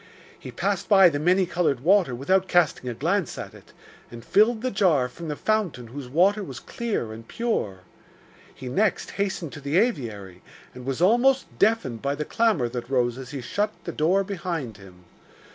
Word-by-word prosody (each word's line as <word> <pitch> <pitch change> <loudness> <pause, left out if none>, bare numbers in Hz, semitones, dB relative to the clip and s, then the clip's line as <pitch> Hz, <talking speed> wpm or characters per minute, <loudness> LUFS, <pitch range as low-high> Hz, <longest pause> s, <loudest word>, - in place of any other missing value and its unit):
He - - -9
passed - - -2
by 195 -3 +7
the 145 -3 -3
many 180 +4 +3
coloured 165 -8 0
water 175 -4 +3
without 185 +9 +1
casting 170 -8 +2
a 120 - -5
glance 170 - -1
at - - -7
it, - - -16 0.4
and 120 0 -11
filled 220 +3 +3
the 255 - 0
jar 170 -10 +2
from 165 +6 -9
the 150 - -3
fountain 180 - -1
whose 130 0 -8
water 195 +9 +3
was 135 -9 -8
clear 205 - -4
and 115 +1 -11
pure. 105 - -2 0.7
He 130 - -10
next 200 +12 0
hastened 185 -6 -3
to 145 - -9
the 140 +4 0
aviary, 110 - -1 0.3
and 125 0 -10
was 135 +5 -1
almost 250 +7 +4
deafened 200 - +1
by 140 +1 -1
the 150 +1 -4
clamour 220 - +1
that 120 0 -6
rose 125 -2 0
as 130 -1 -8
he 135 0 -6
shut 205 - -1
the - - -4
door 180 +6 +2
behind 170 - -4
him. 95 -2 -16
155 Hz, 185 wpm, -25 LUFS, 125-200 Hz, 0.7 s, by